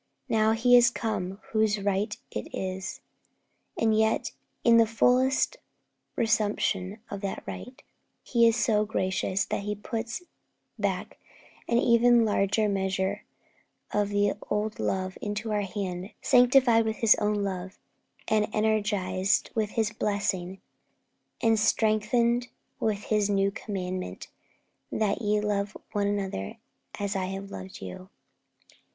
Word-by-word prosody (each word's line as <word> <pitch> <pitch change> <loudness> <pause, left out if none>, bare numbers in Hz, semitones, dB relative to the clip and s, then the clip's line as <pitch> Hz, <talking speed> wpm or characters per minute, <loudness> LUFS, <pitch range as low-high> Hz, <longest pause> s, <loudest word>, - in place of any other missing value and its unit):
Now 220 0 +3
He 245 +2 +5
is 240 0 +7
come 205 -5 -3
whose 215 -1 +2
right 200 +2 -1
it 105 - -4
is; 190 0 -4 0.8
and 220 -1 +2
yet 220 0 +1 0.3
in 230 -1 +6
the 230 -1 +5
fullest 255 - +2 0.6
resumption 205 -3 0
of 200 - -5
that 200 -2 -4
right, 250 +2 -8 0.4
He 235 -2 +4
is 230 - +3
so 215 -3 +2
gracious 190 -2 -1
that - - -2
He 210 +1 -3
puts 225 - -5 0.6
back - - -2 0.5
an 235 - +2
even 235 0 +5
larger 210 +1 +2
measure 190 0 -1 0.7
of 205 -1 +1
the 205 0 +2 0.2
old 210 +1 -1
love 185 0 -2
into 210 +1 -3
our 210 -1 +1
hand, 190 -1 -4
sanctified 245 -2 +5
with 220 0 -2
His 225 -2 +6
own 210 0 +1
love, 190 -1 -4 0.5
and 215 -1 +2
energized 205 -3 +1
with 220 -3 0
His 220 -2 +1
blessing, 195 -3 -2 0.8
and 225 -1 +4
strengthened 235 +3 +2 0.3
with 210 -2 -1
His 210 -2 +1
new 195 0 +2
commandment, 185 -3 -5 0.6
'That 215 +1 0
ye 210 -1 +1
love 205 0 -1
one 205 -1 0
another, 195 - -3 0.4
as 200 0 -2
I 190 -1 0
have 195 +1 -6
loved 95 0 -8
you.' 185 - -8
210 Hz, 130 wpm, -27 LUFS, 195-225 Hz, 0.8 s, is